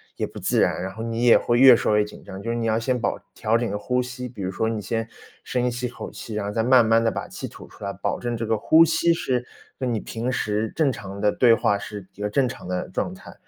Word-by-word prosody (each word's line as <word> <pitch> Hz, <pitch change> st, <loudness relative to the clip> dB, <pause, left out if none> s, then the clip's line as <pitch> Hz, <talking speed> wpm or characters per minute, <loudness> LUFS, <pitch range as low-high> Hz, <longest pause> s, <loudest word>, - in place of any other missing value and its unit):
也 -, -, -2 dB
不 -, -, -12 dB
自 -, -, +1 dB
然， -, -, +2 dB
然 95 Hz, 0 st, -5 dB
后 110 Hz, -, -7 dB
你 115 Hz, 0 st, -2 dB
也 120 Hz, -, +7 dB
会 120 Hz, -, +1 dB
越 130 Hz, -1 st, +9 dB
说 105 Hz, -2 st, +1 dB
越 105 Hz, -, +4 dB
紧 105 Hz, -, -12 dB
张。 95 Hz, -, -8 dB
就 115 Hz, -, -5 dB
是 -, -, -1 dB
你 115 Hz, -, -2 dB
要 110 Hz, 0 st, +2 dB
先 125 Hz, +2 st, 0 dB
保 -, -, -1 dB, 0.2 s
调 110 Hz, 0 st, +1 dB
整 120 Hz, 0 st, -1 dB
你 -, -, -4 dB
的 105 Hz, -, -2 dB
呼 125 Hz, +3 st, 0 dB
吸。 125 Hz, 0 st, -6 dB
比 115 Hz, -4 st, -10 dB
如 95 Hz, 0 st, -2 dB
说 110 Hz, +4 st, -1 dB
你 110 Hz, -1 st, -2 dB
先 115 Hz, +2 st, -2 dB, 0.4 s
深 125 Hz, -1 st, 0 dB
吸 120 Hz, +1 st, -4 dB
一 -, -, -2 dB
口 120 Hz, -, -8 dB
气， 110 Hz, -, -8 dB
然 105 Hz, -1 st, -2 dB
后 100 Hz, -, -3 dB
再 115 Hz, -, 0 dB
慢 125 Hz, -1 st, +6 dB
慢 115 Hz, +1 st, +4 dB
地 115 Hz, -, +3 dB
把 -, -, -5 dB
气 -, -, -7 dB
吐 -, -, -12 dB
出 -, -, -14 dB
来， -, -, -3 dB
保 -, -, -3 dB
证 120 Hz, -1 st, -2 dB
这 115 Hz, 0 st, -3 dB
个 110 Hz, 0 st, +1 dB
呼 160 Hz, +9 st, +6 dB
吸 170 Hz, +1 st, +3 dB
是 125 Hz, -6 st, -1 dB, 0.3 s
跟 125 Hz, -2 st, -1 dB
你 110 Hz, -, 0 dB
平 115 Hz, +2 st, -4 dB
时 110 Hz, -3 st, -1 dB
正 155 Hz, -4 st, +2 dB
常 100 Hz, -4 st, -8 dB
的 105 Hz, -, +3 dB
对 120 Hz, +1 st, +5 dB
话， 100 Hz, -2 st, +2 dB
是 100 Hz, -1 st, -8 dB
一 105 Hz, -, -11 dB
个 105 Hz, -, -1 dB
正 130 Hz, +4 st, +2 dB
常 120 Hz, -, -9 dB
的 90 Hz, 0 st, -3 dB
状 -, -, -2 dB
态。 -, -, -12 dB
115 Hz, 315 characters per minute, -24 LUFS, 105-125 Hz, 0.4 s, 越